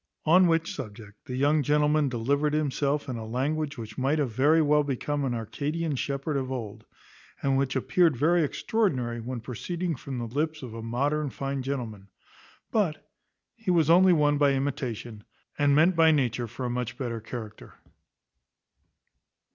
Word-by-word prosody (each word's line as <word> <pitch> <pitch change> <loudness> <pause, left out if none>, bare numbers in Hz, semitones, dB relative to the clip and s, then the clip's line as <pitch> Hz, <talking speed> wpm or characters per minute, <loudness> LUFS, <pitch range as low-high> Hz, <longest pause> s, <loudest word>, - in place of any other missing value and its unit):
On 180 +3 +6
which 165 0 +1
subject 105 -4 -9
the 125 - -4
young 145 +3 +3
gentleman 150 0 +2
delivered 140 +5 0
himself 145 -1 0
in 125 -3 -4
a 115 - -6
language 145 +5 -2
which 110 -1 -7
might 135 +4 +1
have 140 -6 0
very 145 +8 +4
well 150 -1 +4
become 145 +1 -2
an 125 -3 -1
Arcadian 150 +7 -3
shepherd 140 +2 -2
of 130 -1 -3
old, 115 -6 -6 0.6
and 135 -1 +2
which 135 0 0
appeared 160 +2 +2
very 165 +5 +3
extraordinary 135 - -1
when 120 +1 -5
proceeding 170 +8 -3
from 135 0 -7
the 120 - -3
lips 155 +5 -2
of 120 -3 -7
a 115 - -6
modern 140 +6 -1
fine 135 +1 -3
gentleman; 120 -7 -5 0.6
but 195 -9 -1 0.4
he 225 -4 -6
was 165 -3 +4
only 185 +2 +7
one 145 -3 +3
by 140 -1 +4
imitation, 125 -6 -4 0.4
and 145 -1 +4
meant 165 +5 +4
by 165 -1 +6
nature 125 -5 +1
for 125 +3 -6
a - - 0
much 125 -1 -3
better 120 -4 -4
character. 110 -1 -8
140 Hz, 165 wpm, -27 LUFS, 125-155 Hz, 0.6 s, only